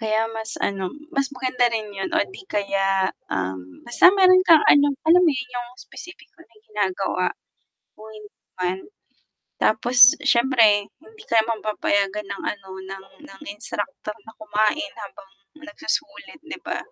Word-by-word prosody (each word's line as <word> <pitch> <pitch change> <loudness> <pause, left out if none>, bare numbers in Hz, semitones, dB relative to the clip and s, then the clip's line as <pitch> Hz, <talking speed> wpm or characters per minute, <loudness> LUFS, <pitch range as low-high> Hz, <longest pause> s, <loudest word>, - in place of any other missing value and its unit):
kaya 220 0 0 0.2
mas 220 0 -5 0.2
ano, 195 -1 -5 0.3
mas 275 - +2
maganda 255 -1 -1
rin 220 -1 -3
'yun 195 - -4
o - - +4
'di 390 - -12
kaya, 200 -1 0 0.5
um, 95 0 -3 0.3
basta 240 - -1
meron 370 -1 +6
kang 320 -3 +7
ano, 285 0 +5 0.2
alam 355 +2 +6
mo 320 - +5
'yun, 250 0 -7
'yung 245 -1 -5 0.2
specific 360 0 -12
na 335 - -18
may 220 -2 -26
ginagawa, 195 -3 -2 0.7
kung 215 +1 -14
hindi 210 -1 -14 0.3
man. 180 +1 -1 0.9
Tapos 240 +3 0 0.3
siyempre, 240 -1 +4 0.4
hindi 440 -1 -16
ka 230 - +4
mapapayagan 210 -2 -1
ng 200 - -6
ano 200 -2 -18 0.2
ng 195 0 -9 0.2
ng 195 - -15
instructor 210 +1 -6
na 220 - -13
kumain 215 +8 -1
habang 195 -1 -12 0.4
nagsusulit, 300 +1 -5
'di 330 - -8
ba? - - -3
220 Hz, 150 wpm, -22 LUFS, 200-265 Hz, 0.9 s, kang